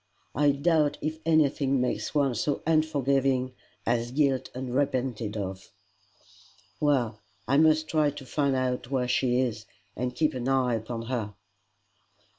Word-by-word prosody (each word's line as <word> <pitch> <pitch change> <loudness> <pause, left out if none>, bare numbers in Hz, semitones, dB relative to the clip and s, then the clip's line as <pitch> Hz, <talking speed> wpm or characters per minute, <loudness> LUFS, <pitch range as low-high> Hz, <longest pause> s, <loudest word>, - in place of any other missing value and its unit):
I 145 +3 +3
doubt 150 +1 +2
if 155 +1 -3
anything 140 -4 +3
makes 125 +4 -2
one 140 -3 +2
so 140 +5 -1
unforgiving 135 -5 +1 0.3
as 120 0 0
guilt 135 -1 +1
unrepented 125 -4 -1
of." 95 -1 -5 1.1
"Well, 125 -7 +1 0.3
I 140 - +3
must 155 0 +4
try 155 -2 +2
to 145 -1 -9
find 140 0 0
out 125 -2 -1
where 130 -2 0
she 125 0 +1
is, 110 -4 -2 0.3
and 125 +1 -3
keep 155 -1 +1
an 125 -1 -4
eye 130 -2 +2
upon 115 +1 -4
her." 115 -4 -3
130 Hz, 135 wpm, -27 LUFS, 120-145 Hz, 1.1 s, must